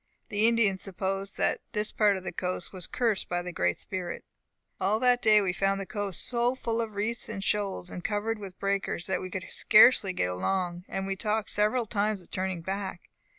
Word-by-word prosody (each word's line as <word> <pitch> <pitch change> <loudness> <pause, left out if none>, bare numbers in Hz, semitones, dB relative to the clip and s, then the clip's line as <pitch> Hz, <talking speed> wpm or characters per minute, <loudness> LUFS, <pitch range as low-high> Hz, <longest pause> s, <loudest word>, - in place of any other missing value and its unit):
The 210 +2 +3
Indians 215 -5 +2
supposed 195 +1 -3
that - - +1
this 210 0 0
part 205 -2 +3
of 185 - -8
the - - -4
coast 180 0 -3
was 185 -3 -5
cursed 225 -6 0
by 175 0 -1
the 180 - -5
Great 90 - 0
Spirit. 185 -2 -5 0.5
"All 200 +3 +2
that 245 0 +4
day 215 -2 +6
we 185 -2 0
found 195 +2 +1
the 195 - -4
coast 200 -3 -2
so 245 +1 +2
full 230 -2 -1
of 220 -2 -5
reefs 220 +4 -2
and 200 -3 -4
shoals, 200 -3 -1
and 180 - -7
covered 215 +2 -1
with 195 -3 -9
breakers, 195 -3 -1
that 190 - 0
we 185 - -5
could 190 0 -5
scarcely 215 -3 +6
get 90 - -1
along; 175 - -2
and 195 - -3
we 195 0 -2
talked 215 +2 -1
several 215 +4 +2
times 210 -1 0
of 180 - -19
turning 185 -2 -2
back. 190 -1 -5
195 Hz, 205 wpm, -28 LUFS, 185-215 Hz, 0.5 s, day